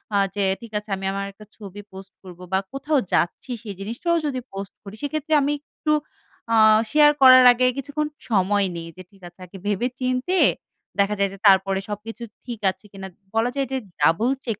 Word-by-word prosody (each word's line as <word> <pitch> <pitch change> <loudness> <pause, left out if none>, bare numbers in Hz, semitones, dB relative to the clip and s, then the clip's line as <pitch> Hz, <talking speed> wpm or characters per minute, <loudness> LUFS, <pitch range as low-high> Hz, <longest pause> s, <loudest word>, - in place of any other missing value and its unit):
আ - - +4 0.2
যে, 200 - 0 0.2
ঠিক 230 -2 -11
আছে, 210 - -18
আমি 190 0 -7
আমার 200 0 -3
একটা 215 +2 -15
ছবি 205 -1 -10
পোস্ট 190 +1 -11
করবো 180 -1 -12
বা, 190 - +4
কোথাও 285 +2 0
যাচ্ছি 175 +8 0
সেই 205 -4 -7
জিনিসটাও 235 - -1
যদি 270 -3 -2
পোস্ট 195 0 -7
করি, 200 0 -10
সেক্ষেত্রে 310 +1 -3
আমি 285 +1 +1 0.3
একটু 305 0 +1 0.6
আ - - +4 0.4
শেয়ার 295 -1 +6
করার 255 -1 +9
আগে 250 +1 +1
কিছুক্ষণ 290 +2 -3 0.2
সময় 200 -1 +2
নেই। 165 0 -7
যে - - -9
ঠিক 195 -1 -23
আছে, 175 +1 -18
আগে 180 +2 -12
ভেবে 210 +4 0
চিন্তে 255 +8 -1 0.6
দেখা 200 +1 +2
যায় 200 0 +2
যে - - -10
তারপরে 195 0 +4
সবকিছু 220 +3 -7 0.2
ঠিক 240 -3 -6
আছে 200 - -21
কিনা 195 -1 -8 0.3
বলা 225 +2 +2
যায় 275 -1 -1
যে, 265 - 0 0.2
double 165 - +3
check 225 -5 -3
210 Hz, 195 wpm, -23 LUFS, 195-260 Hz, 0.6 s, করার